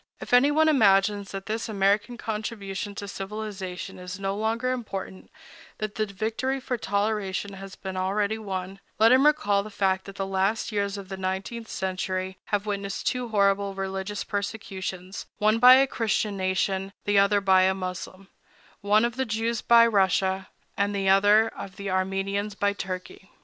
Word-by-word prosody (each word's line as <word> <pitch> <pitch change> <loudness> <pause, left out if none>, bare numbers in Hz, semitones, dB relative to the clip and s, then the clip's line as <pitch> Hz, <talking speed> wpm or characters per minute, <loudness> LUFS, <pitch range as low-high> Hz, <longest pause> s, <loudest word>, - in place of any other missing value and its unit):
If - - -7
anyone 290 +5 +5
imagines 205 -7 +3
that 195 0 -6
this 225 +2 -3
American 205 +3 +1
contribution 210 -3 -4
to 200 - -6
civilization 195 -2 -6
is 180 +1 -7
no 195 0 -2
longer 225 +4 -1
important,—that 240 - -7
the 215 -2 -1
victory 220 +7 -2
for 255 -1 -3
toleration 205 -2 -1
has 195 0 -9
been 190 -1 -7
already 200 +3 0
won,—let 195 +2 -1
him 265 +3 +6
recall 205 -10 +2
the 210 - -8
fact 190 -2 0
that 195 - -10
the 195 - -2
last 195 +4 0
years 200 -1 -1
of 195 -2 -9
the 190 - -5
nineteenth 190 +5 -4
century 185 0 -3
have 205 0 -1
witnessed 200 -1 -3
two 250 -1 -1
horrible 200 -2 +1
religious 195 +1 -3
persecutions, 195 -2 -5
one 215 +2 +3
by 250 +2 +10
a 270 +1 +5
Christian 220 -4 -1
nation, 190 +1 -1
the 205 -1 +4
other 200 +1 +4
by 190 -1 +4
a 190 0 +3
Moslem—one, 195 +3 -3
of 240 +1 -3
the 265 - 0
Jews 225 0 -1
by 235 0 +6
Russia, 190 -3 +1 0.3
and 205 -1 0
the 195 -1 +1
other, 205 +3 +5
of 195 -3 -9
the 200 -1 -5
Armenians 195 +2 -1
by 205 0 +1
Turkey. 190 0 -7
200 Hz, 160 wpm, -26 LUFS, 190-220 Hz, 0.3 s, by